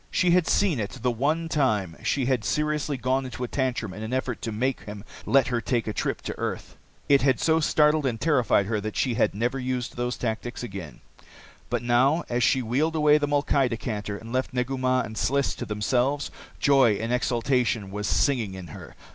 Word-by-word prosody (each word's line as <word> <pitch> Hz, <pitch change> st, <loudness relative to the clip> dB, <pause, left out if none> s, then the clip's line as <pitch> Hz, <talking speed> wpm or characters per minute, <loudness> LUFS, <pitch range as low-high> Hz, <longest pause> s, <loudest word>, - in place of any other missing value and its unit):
She 180 Hz, -2 st, +2 dB
had 180 Hz, -1 st, +3 dB
seen 185 Hz, -10 st, +2 dB
it 105 Hz, +4 st, -4 dB
the 125 Hz, -, +2 dB
one 150 Hz, +8 st, 0 dB
time 110 Hz, -, 0 dB
she 135 Hz, -3 st, 0 dB
had 125 Hz, -3 st, +1 dB
seriously 150 Hz, -1 st, -1 dB
gone 130 Hz, +1 st, 0 dB
into 130 Hz, -1 st, -6 dB
a -, -, -2 dB
tantrum 125 Hz, -7 st, -2 dB
in 105 Hz, -, -8 dB
an 110 Hz, +3 st, -4 dB
effort 130 Hz, -2 st, -2 dB
to 115 Hz, -, -3 dB
make 125 Hz, +5 st, -1 dB
him 105 Hz, -1 st, -8 dB, 0.2 s
let 135 Hz, -1 st, +4 dB
her 120 Hz, -2 st, 0 dB
take 120 Hz, -1 st, -1 dB
a 110 Hz, -, -3 dB
trip -, -, -2 dB
to -, -, -4 dB
earth. -, -, -4 dB, 0.3 s
It 140 Hz, -1 st, +5 dB
had 135 Hz, -3 st, +2 dB
so 160 Hz, 0 st, +3 dB
startled 150 Hz, -1 st, +3 dB
and 115 Hz, -3 st, -2 dB
terrified 125 Hz, -8 st, +2 dB
her 105 Hz, 0 st, -1 dB
that 110 Hz, 0 st, -5 dB
she 125 Hz, -, +1 dB
had 115 Hz, -3 st, +1 dB
never 120 Hz, +5 st, -1 dB
used 125 Hz, -2 st, -3 dB
those 120 Hz, 0 st, -2 dB
tactics 120 Hz, +1 st, -4 dB
again. 95 Hz, -, -8 dB, 0.7 s
But -, -, -1 dB
now, 130 Hz, +7 st, +3 dB
as 120 Hz, 0 st, 0 dB
she 130 Hz, +1 st, +3 dB
wheeled 145 Hz, +8 st, 0 dB
away 150 Hz, -1 st, +5 dB
the 145 Hz, -, 0 dB
molkai 140 Hz, -2 st, +2 dB
decanter 105 Hz, -3 st, -4 dB
and 115 Hz, +3 st, -10 dB
left 130 Hz, 0 st, -1 dB
Negu 125 Hz, +2 st, -1 dB
Mah 130 Hz, 0 st, +1 dB
and 110 Hz, -, -6 dB
Sliss 140 Hz, +4 st, +1 dB
to -, -, -5 dB
themselves, 125 Hz, +7 st, 0 dB, 0.3 s
joy 135 Hz, -6 st, +5 dB
and 115 Hz, +4 st, -2 dB
exultation 120 Hz, -4 st, 0 dB
was 105 Hz, +1 st, -3 dB
singing 115 Hz, -9 st, +1 dB
in 90 Hz, -3 st, -9 dB
her. -, -, -11 dB
125 Hz, 205 wpm, -26 LUFS, 110-140 Hz, 0.7 s, It